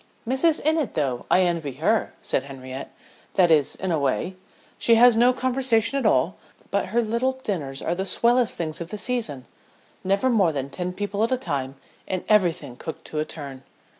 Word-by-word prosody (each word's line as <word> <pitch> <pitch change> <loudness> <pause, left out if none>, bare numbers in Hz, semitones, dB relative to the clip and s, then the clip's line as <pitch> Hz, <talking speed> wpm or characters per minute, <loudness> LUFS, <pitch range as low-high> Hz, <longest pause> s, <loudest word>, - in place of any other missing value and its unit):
"Mrs. 300 +6 +2
Innitt, 310 -4 +1
though 130 -5 -1
I 185 - +5
envy 170 -6 0
her," 200 - 0
said 135 - -1
Henriette; 130 -1 -8 0.4
"that 175 -3 +4
is, 150 -4 +3
in 190 -1 -3
a 160 - +1
way. 140 +7 -1 0.4
She 230 - +4
has 240 0 +7
no 240 +2 +5
conversation 255 -1 +1
at 240 - +1
all, 135 +2 +2 0.3
but 200 - 0
her 235 +5 +1
little 235 +4 0
dinners 175 - -4
are 170 - 0
the 190 +2 -2
swellest 235 +4 +3
things 160 -1 -3
of 170 - -4
the 210 - -5
season. 210 - -2 0.6
Never 195 +7 +2
more 195 -8 +3
than 140 -2 -4
ten 180 0 -3
people 205 +2 -2
at 230 - 0
a 255 - +2
time 140 - -3 0.3
and 185 -1 -2
everything 170 - +1
cooked 160 - -7
to 155 - -2
a 155 - 0
turn." 140 -5 -8
190 Hz, 190 wpm, -24 LUFS, 150-235 Hz, 0.6 s, has